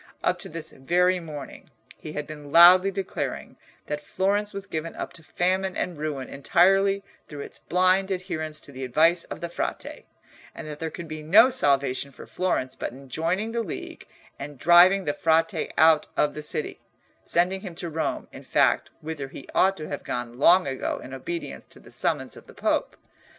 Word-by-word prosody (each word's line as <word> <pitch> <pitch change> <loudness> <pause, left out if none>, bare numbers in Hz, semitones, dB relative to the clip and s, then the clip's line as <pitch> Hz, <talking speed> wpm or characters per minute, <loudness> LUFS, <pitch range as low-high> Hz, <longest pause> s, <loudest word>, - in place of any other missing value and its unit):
Up - - +1
to - - -5
this 165 0 -7
very 180 +7 +1
morning 150 -5 -9 0.3
he 155 - -9
had 150 -1 -4
been 150 -1 -10
loudly 180 +4 +8
declaring 195 -1 -4 0.3
that 150 0 -4
Florence 200 +7 0
was 200 0 -6
given 165 -3 -5
up - - -6
to 165 - -9
famine 185 +3 -1
and 180 - -2
ruin 150 -3 -4
entirely 195 +7 +3 0.2
through 145 -1 -8
its - - -7
blind 185 +2 +2
adherence 170 -5 -4
to - - -13
the 130 0 -7
advice 160 +7 +3
of - - -8
the 170 - -3
Frate, 170 - -5 0.5
and - - -8
that 150 -1 -7
there 160 - -3
could 165 +2 -8
be 155 0 -6
no 215 +12 +6
salvation 140 - +1
for - - -12
Florence 130 -8 -2
but - - -4
in 135 +2 -13
joining 180 - -1
the 235 0 -1
League 190 -9 -7 0.3
and 145 0 -7
driving 180 +6 +6
the 145 - 0
Frate 165 +2 +1
out 160 -1 +5
of 150 - +2
the 150 - -6
city—sending 175 +4 -2
him 180 -4 -8
to 175 - -5
Rome, 160 0 -3
in - - -10
fact, - - +2
whither 155 -3 -5
he 135 - -11
ought 195 +1 +3
to 155 - -6
have 145 - -5
gone 120 0 -5
long 180 +5 +6
ago 135 -1 -3
in 130 - -10
obedience 170 +6 -6
to - - -15
the - - -17
summons - - -1
of - - -14
the - - -15
Pope. - - -1
165 Hz, 185 wpm, -25 LUFS, 150-185 Hz, 0.5 s, loudly